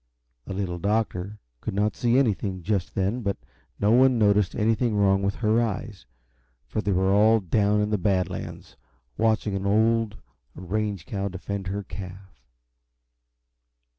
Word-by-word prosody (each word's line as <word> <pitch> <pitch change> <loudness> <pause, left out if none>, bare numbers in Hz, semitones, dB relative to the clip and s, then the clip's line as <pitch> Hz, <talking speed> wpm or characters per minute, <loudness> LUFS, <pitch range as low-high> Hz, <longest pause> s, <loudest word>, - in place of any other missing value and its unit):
The 95 - -6
Little 90 -3 -3
Doctor 105 -1 -1 0.2
could 95 - -5
not 105 +2 +1
see 120 +1 +2
anything, 100 -7 0
just 100 -1 -1
then, 100 +6 0
but 100 -3 -2 0.4
no 105 +1 +3
one 130 +1 +5
noticed 105 -3 +3
anything 115 +1 +1
wrong 100 -1 +3
with 100 0 -1
her 110 0 +2
eyes, 105 - -4 0.6
for 110 - -3
they 105 - -1
were 95 +1 +2
all 110 +2 +5
down 105 +2 +1
in 105 0 -1
the 105 - +1
Bad 95 -1 +1
Lands, - - -8 0.4
watching 110 -2 +1
an 95 0 -2
old 110 +1 +2 0.4
range 100 0 -3
cow 100 0 -3
defend 95 +1 -5
her 100 +2 -3
calf. 95 -7 -10
100 Hz, 150 wpm, -25 LUFS, 95-110 Hz, 0.6 s, one